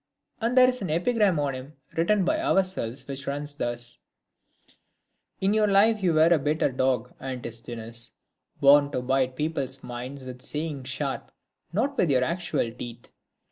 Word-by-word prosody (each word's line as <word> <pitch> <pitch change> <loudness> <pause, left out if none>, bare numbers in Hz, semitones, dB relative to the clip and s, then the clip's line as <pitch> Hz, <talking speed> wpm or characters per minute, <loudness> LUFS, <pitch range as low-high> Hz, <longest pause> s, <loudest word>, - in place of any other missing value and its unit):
And 235 +2 0
there 255 0 +9
is 255 -2 -1
an 190 - -3
epigram 185 +1 +2
on 140 -2 0
him 130 +3 -8 0.2
written 185 +4 +2
by 315 - +1
ourselves, 185 - 0
which 140 0 -6
runs 145 +1 -3
thus: 120 -3 -3 0.7
— - - -45
In 195 +1 +3
life 215 0 +4
you 180 -3 +2
were 160 +2 +6
a 165 - +3
bitter 150 0 +1
dog, 125 -2 0
Antisthenes, 115 -2 -5 0.5
Born 145 +1 +6
to 125 - -1
bite 130 0 +1
people's 140 -3 -2
minds 125 +3 -6
with 125 -1 -8
sayings 150 -3 -4
sharp, 135 +1 -3 0.4
Not 270 +10 0
with 175 - +3
your 130 -2 +3
actual 170 -6 -1
teeth. 120 0 -9
140 Hz, 155 wpm, -26 LUFS, 125-185 Hz, 0.7 s, there